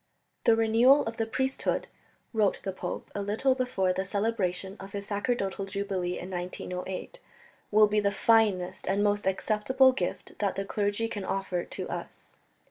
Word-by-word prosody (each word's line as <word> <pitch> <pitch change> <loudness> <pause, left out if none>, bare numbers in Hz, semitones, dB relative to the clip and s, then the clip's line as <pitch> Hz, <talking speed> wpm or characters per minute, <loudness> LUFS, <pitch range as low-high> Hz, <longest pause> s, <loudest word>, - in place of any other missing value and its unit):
"The 230 - +6
renewal 230 +5 +5
of 225 0 -4
the 225 - 0
priesthood," 265 +3 -1 0.5
wrote 215 -3 +1
the 195 - -2
pope 185 - -6
a 205 - -3
little 215 +7 +2
before 250 -8 0
the 190 - -1
celebration 195 -2 -1
of 195 +1 -10
his 200 0 -4
sacerdotal 200 -2 -1
jubilee 195 -2 -2
in 185 - -7
1908, 180 - -5 0.5
"will 215 0 +6
be 210 +1 +2
the 200 -1 +2
finest 200 -4 +2
and 200 +2 +2
most 205 -1 +1
acceptable 225 +7 +3
gift 185 -9 -4
that 200 -2 0
the 195 - -2
clergy 205 +2 0
can 205 -3 -5
offer 190 -2 -2
to - - -5
us." - - -7
205 Hz, 160 wpm, -28 LUFS, 190-225 Hz, 0.5 s, The